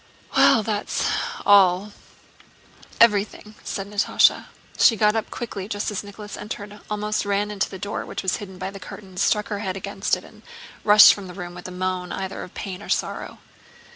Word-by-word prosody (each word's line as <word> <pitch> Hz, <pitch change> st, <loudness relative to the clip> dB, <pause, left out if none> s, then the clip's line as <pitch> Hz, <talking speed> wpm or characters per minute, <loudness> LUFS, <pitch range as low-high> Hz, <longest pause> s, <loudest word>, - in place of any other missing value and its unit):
"Well, 220 Hz, -, +5 dB
that's 210 Hz, -1 st, -1 dB, 0.4 s
all—everything," 205 Hz, +2 st, +1 dB
said 195 Hz, -1 st, -4 dB
Natásha. 205 Hz, 0 st, +3 dB, 0.3 s
She 230 Hz, -, +6 dB
got 210 Hz, 0 st, +3 dB
up 225 Hz, -, -2 dB
quickly 205 Hz, -5 st, -6 dB
just 205 Hz, 0 st, -3 dB
as 205 Hz, -, -4 dB
Nicholas 205 Hz, 0 st, -9 dB
entered, 210 Hz, 0 st, -7 dB
almost 210 Hz, 0 st, -1 dB
ran 205 Hz, 0 st, -1 dB
to -, -, +1 dB
the 190 Hz, -, -8 dB
door 200 Hz, +2 st, -4 dB
which -, -, -5 dB
was 190 Hz, -, 0 dB
hidden 190 Hz, -3 st, -9 dB
by 190 Hz, +1 st, -5 dB
curtains, 195 Hz, -1 st, -8 dB
struck 210 Hz, 0 st, +1 dB
her 205 Hz, -, -3 dB
head 190 Hz, -2 st, -3 dB
against 195 Hz, +1 st, -1 dB
it, -, -, -12 dB
and -, -, -16 dB, 0.4 s
rushed 210 Hz, 0 st, +9 dB
from 200 Hz, -2 st, -8 dB
the 180 Hz, -, -10 dB
room 175 Hz, -2 st, -7 dB
with 180 Hz, +1 st, -9 dB
a -, -, -8 dB
moan 180 Hz, 0 st, -3 dB
either 190 Hz, 0 st, -4 dB
of 180 Hz, -, -10 dB
pain 190 Hz, -2 st, -6 dB
or -, -, -11 dB
sorrow. -, -, -2 dB
200 Hz, 175 wpm, -23 LUFS, 190-210 Hz, 0.4 s, rushed